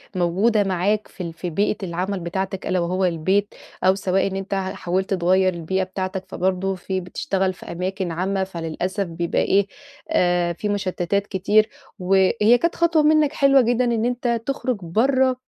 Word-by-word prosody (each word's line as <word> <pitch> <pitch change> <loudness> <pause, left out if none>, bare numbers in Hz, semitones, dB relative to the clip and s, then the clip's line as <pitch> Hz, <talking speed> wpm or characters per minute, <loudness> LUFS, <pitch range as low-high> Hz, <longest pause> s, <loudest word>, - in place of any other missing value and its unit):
موجودة 195 +5 +2
معاك 195 +3 0
في 185 - -8
ال 170 -1 -5
في 175 +2 -5
بيئة 205 +6 0
العمل 185 +2 -2
بتاعتك، 190 +2 -4
ألا 185 -1 +1
وهو 185 +2 0
البيت، 185 +5 0 0.3
أو 185 +1 +5
سواء 195 0 0
إن 190 - -4
أنت 195 +1 -4
حاولت 190 0 -2
تغيِّر 185 +1 +2
البيئة 175 +3 -1
بتاعتك، 185 0 -4
فبرضه 190 +1 -1
في 185 +1 -3
بتشتغل 190 - -2
في - - -10
أماكن 185 +1 -3
عامة، 190 +3 -1
فللأسف 185 +2 -3
بيبقى 170 0 -1
إيه، 200 0 +2 0.4
آآ، 175 - +2
في 210 +5 -4
مُشتِّتات 200 0 -1
كتير. 210 +3 +2 0.3
وهي 195 +5 +4
كانت 340 0 +1
خطوة 335 -2 +3
منك 305 -1 +4
حلوة 275 -1 +5
جدًا 245 +1 +1
إن 235 -1 0
أنت 240 -1 -1
تخرِّج 260 -3 -1
برَّه 255 +9 +2
190 Hz, 165 wpm, -22 LUFS, 180-210 Hz, 0.4 s, أو